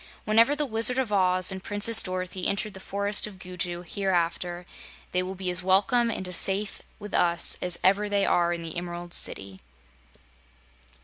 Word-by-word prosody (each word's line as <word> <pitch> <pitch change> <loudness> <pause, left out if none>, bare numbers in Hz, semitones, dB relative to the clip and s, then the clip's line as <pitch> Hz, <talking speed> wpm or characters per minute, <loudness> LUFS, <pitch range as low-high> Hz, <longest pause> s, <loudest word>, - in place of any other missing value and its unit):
Whenever 230 +6 +4
the 295 0 -2
Wizard 230 0 +3
of 250 -5 -1
Oz 185 -1 +3
and 190 -1 -6
Princess 215 +2 +4
Dorothy 185 0 -3
enter 200 +1 -1
the 190 - -11
Forest 200 +2 -1
of 205 -3 -12
Gugu 180 -1 -5
hereafter, 175 -2 -2 0.5
they 180 - +1
will 185 +1 -5
be 185 -1 -2
as 180 0 +1
welcome 200 +6 +2
and 190 -4 -4
as 180 -2 -1
safe 200 +2 0 0.2
with 210 -1 -10
us 170 -1 +3
as 180 -1 0
ever 200 +2 +2
they 200 -1 +1
are 175 -1 +1
in 170 -1 -4
the 165 -1 -7
Emerald 175 0 -7
City." 95 -1 -1
190 Hz, 175 wpm, -26 LUFS, 180-205 Hz, 0.5 s, Whenever